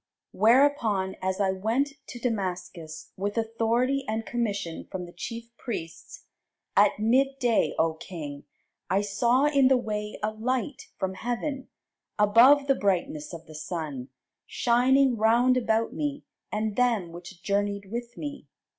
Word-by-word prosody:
Whereupon 225 -4 +3
as 190 +1 -1
I 195 -2 +2
went 225 +9 0 0.2
to 245 - -8
Damascus 180 -8 -4
with 205 +3 -3
authority 230 +4 +1
and 220 +1 -2
commission 205 -8 -3
from 180 -1 -4
the 175 - -12
chief 230 +6 -7
priests, 165 -9 -7 0.5
at - - +5
midday, 250 +2 +2
O 160 0 +2
king, 155 -4 -8 0.4
I 195 - +2
saw 235 +7 +2
in 280 -3 +4
the 260 0 +5
way 210 -3 -4
a 215 - +1
light 250 +5 -3
from 190 0 -2
heaven, 245 +6 -4 0.5
above 235 +8 +6
the 275 - +4
brightness 175 - -1
of 165 -1 -9
the 155 - -13
sun, 155 -4 -5 0.4
shining 255 +1 +3
round 235 +4 +4
about 230 -2 +1
me 290 -1 -3 0.3
and 215 -1 -1
them 230 -8 +1
which 175 +1 -11
journeyed 200 0 -1
with 235 0 -5
me. 290 -1 -6
220 Hz, 135 wpm, -27 LUFS, 190-250 Hz, 0.5 s, above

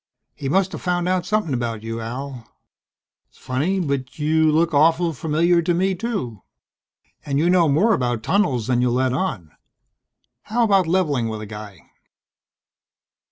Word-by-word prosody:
"He 135 - -5
musta 190 +4 +1
found 180 -1 -1
out 185 -1 0
something 210 -8 0
about 115 -3 -3
you, 115 0 -4
Al. 125 +1 -6 0.8
S'funny 150 +10 -2
but 135 -2 -3
you 155 +1 +2
look 165 +1 +2
awful 165 +3 +3
familiar 165 +4 +1
to 170 +1 0
me 190 +2 +1
too. 185 - -4 0.8
And 140 -1 -2
you 170 +4 +3
know 175 -4 +4
more 195 +11 +3
about 120 - -1
tunnels 135 - +1
than 125 -1 +1
you 125 - +2
let 125 +1 +1
on. 115 - -3 1.0
How 235 +3 +2
about 195 -5 +3
leveling 150 -10 +1
with 110 -1 -5
a - - -6
guy?" 105 -3 -11
150 Hz, 150 wpm, -21 LUFS, 125-180 Hz, 1.0 s, know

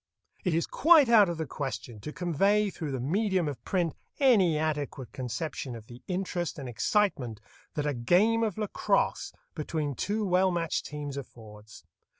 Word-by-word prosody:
It 180 -4 +1
is 165 - +1
quite 315 -5 +5
out 215 -5 +7
of 170 - -3
the 160 - -2
question 130 -5 -5
to 150 - -6
convey 195 +5 +2
through 155 -5 -5
the 130 - -2
medium 185 - +1
of 130 -5 -5
print 175 -4 0 0.3
any 205 - +5
adequate 145 -4 -2
conception 130 0 -4
of 110 -2 -10
the 120 +2 -12
interest 180 -2 -2
and 135 -3 -6
excitement 125 - 0 0.4
that 150 - -1
a 145 - 0
game 185 - +3
of 220 -3 -1
lacrosse 210 -2 0 0.2
between 150 -4 -2
two 210 - -1
well 185 0 +3
matched 170 -2 -1
teams 145 -2 -6
affords. 110 -5 -11
160 Hz, 160 wpm, -29 LUFS, 135-195 Hz, 0.4 s, out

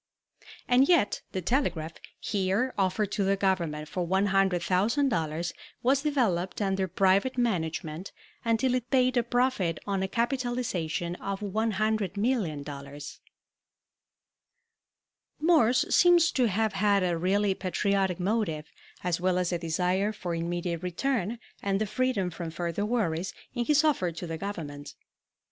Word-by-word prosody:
And 255 +5 +4
yet 335 - +3
the 185 - -3
telegraph, 165 - 0 0.3
here 200 +6 0
offered 195 +1 0
to 205 - 0
the 195 +1 +2
Government 170 -6 -1
for 175 +2 -3
$100,000, 190 - +1 0.3
was 265 +2 +3
developed 215 - 0
under 195 -2 0
private 195 +7 +2
management 175 -6 -2 0.3
until 230 +2 +2
it 250 -1 -2
paid 255 -1 +3
a 240 - +4
profit 235 -8 0
on 195 -1 -1
a 190 - 0
capitalization 235 - -1
of 195 0 -4
$100,000,000. 195 - -2 2.2
Morse 300 -5 +4
seems 345 -1 +5
to 250 -3 +2
have 215 +1 0
had 200 0 +2
a 175 -2 +1
really 195 +4 +1
patriotic 190 0 0
motive, 180 -6 -1 0.3
as 175 -1 -1
well 180 0 +2
as 180 -1 0
a 175 - -1
desire 180 +5 0
for 185 -5 -5
immediate 170 0 -2
return 220 +4 -1 0.2
and 195 -1 0
the 215 - +1
freedom 215 -5 0
from 170 0 -5
further 170 +4 -2
worries, 190 -7 -1 0.2
in 240 -1 -1
his 300 +2 +4
offer 270 - +2
to 165 +2 -7
the 165 -1 -5
Government. 150 -8 -6
195 Hz, 130 wpm, -28 LUFS, 175-235 Hz, 2.2 s, seems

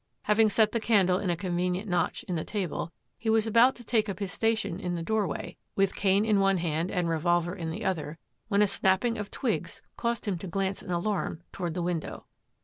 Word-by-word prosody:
Having 215 +1 +4
set 215 +1 +3
the 230 - 0
candle 195 -5 +3
in 200 - -2
a 170 - +1
convenient 180 +2 -1
notch 180 -2 0
in 180 - -4
the 160 - -1
table, 185 -5 -3 0.3
he 225 - -2
was 220 0 +3
about 230 +4 +5
to 240 - -12
take 220 -2 +1
up 195 - -3
his 195 -2 -4
station 220 -3 0
in 180 -3 -2
the 165 - -3
doorway, 210 -4 -2 0.2
with 195 -1 +2
cane 200 +1 +3
in 210 -2 +3
one 195 -1 +3
hand 165 0 -1
and 180 -3 0
revolver 175 +1 +1
in 170 -4 -4
the 160 - -5
other, 165 -4 -2 0.3
when 205 -1 +3
a - - +4
snapping 195 +4 +1
of 210 - -4
twigs - - -2
caused 235 -1 -1
him 195 -5 -1
to 190 - -6
glance 195 +2 -1
in - - -11
alarm 175 -1 -1
toward 175 -3 -4
the 175 - -1
window. 170 -2 -3
190 Hz, 220 wpm, -28 LUFS, 175-215 Hz, 0.3 s, about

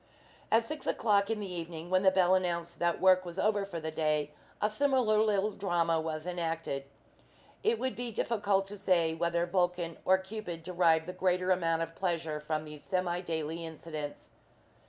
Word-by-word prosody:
At 225 +1 +4
six 310 +6 -6
o'clock 205 -2 +2
in 225 -1 -1
the 195 -3 -5
evening, 170 0 -6
when 185 0 +4
the 190 - +6
bell 185 -1 +3
announced 170 -2 -1
that 175 -1 +1
work 185 -1 +5
was 175 0 -8
over 205 0 +2
for 175 -4 -5
the 160 0 -4
day, 150 -2 0 0.3
a - - +2
similar 235 -2 +2
little 210 -1 +2
drama 170 -5 +1
was 155 0 -4
enacted. 165 -5 -3 0.8
It 445 +2 +2
would 260 -8 -2
be 245 -1 -4
difficult 205 -3 +1
to 205 0 -7
say 170 -4 +2
whether 170 +1 0
Vulcan 175 -2 0
or 190 - +5
Cupid 190 -3 -6
derived 170 -2 +3
the 180 - -6
greater 185 0 +1
amount 165 -2 +2
of 165 0 -7
pleasure 165 -4 -2
from 155 0 -3
these 150 -1 -10
semi 180 -2 -1
daily 165 -1 -3
incidents. 155 -2 -7
175 Hz, 175 wpm, -31 LUFS, 165-195 Hz, 0.8 s, the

